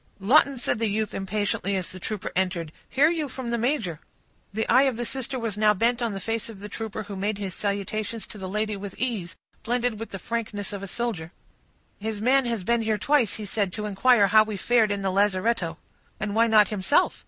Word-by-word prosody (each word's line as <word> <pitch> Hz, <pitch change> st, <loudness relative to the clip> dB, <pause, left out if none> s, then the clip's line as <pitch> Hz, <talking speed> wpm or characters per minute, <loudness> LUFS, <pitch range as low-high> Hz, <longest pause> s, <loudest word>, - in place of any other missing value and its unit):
"Lawton," 265 Hz, +6 st, +4 dB
said 235 Hz, -, -1 dB
the 225 Hz, -, +1 dB
youth, 215 Hz, +1 st, -1 dB
impatiently, 200 Hz, 0 st, -1 dB
as 185 Hz, -2 st, -3 dB
the 185 Hz, -, -9 dB
trooper 210 Hz, +2 st, -4 dB
entered, 180 Hz, -4 st, 0 dB, 0.2 s
"hear 295 Hz, +5 st, +4 dB
you 315 Hz, -4 st, -2 dB
from 255 Hz, -2 st, -5 dB
the 235 Hz, -, +1 dB
major?" 225 Hz, -, 0 dB, 0.5 s
The 220 Hz, +2 st, -2 dB
eye 265 Hz, +3 st, +5 dB
of 245 Hz, -, -5 dB
the 240 Hz, -, -2 dB
sister 265 Hz, +1 st, -3 dB
was 225 Hz, -4 st, -3 dB
now 210 Hz, -1 st, +5 dB
bent 235 Hz, +4 st, +1 dB
on 230 Hz, -3 st, 0 dB
the 195 Hz, -, -4 dB
face 225 Hz, +3 st, -2 dB
of 215 Hz, -4 st, -10 dB
the 205 Hz, -, -7 dB
trooper, 220 Hz, 0 st, -5 dB
who 200 Hz, 0 st, -7 dB
made 200 Hz, +2 st, -1 dB
his 195 Hz, -2 st, -4 dB
salutations 210 Hz, +2 st, -3 dB
to 210 Hz, -, -10 dB
the 190 Hz, -1 st, -5 dB
lady 215 Hz, +1 st, -1 dB
with 200 Hz, -1 st, -7 dB
ease, 220 Hz, -9 st, -2 dB, 0.3 s
blended 240 Hz, -1 st, -1 dB
with 225 Hz, -, -5 dB
the 195 Hz, -, -6 dB
frankness 210 Hz, -2 st, -4 dB
of 200 Hz, -, -5 dB
a 200 Hz, -, -5 dB
soldier. 195 Hz, -7 st, -3 dB, 0.7 s
"His 215 Hz, 0 st, -3 dB
man 255 Hz, +4 st, +4 dB
has 230 Hz, -5 st, -2 dB
been 235 Hz, +4 st, +2 dB
here 220 Hz, -1 st, 0 dB
twice," 235 Hz, -3 st, +2 dB
he 215 Hz, -, -5 dB
said, 200 Hz, -1 st, -1 dB
"to 210 Hz, -, -3 dB
inquire 210 Hz, +2 st, +4 dB
how 215 Hz, +2 st, +7 dB
we 215 Hz, -1 st, -2 dB
fared 225 Hz, +2 st, +3 dB
in 200 Hz, -1 st, -2 dB
the 190 Hz, -, +1 dB
lazaretto." 195 Hz, -1 st, +1 dB, 0.4 s
"And 215 Hz, -1 st, -2 dB
why 230 Hz, +2 st, +4 dB
not 215 Hz, -2 st, +5 dB
himself?" 210 Hz, +6 st, +2 dB
215 Hz, 220 wpm, -26 LUFS, 200-235 Hz, 0.7 s, how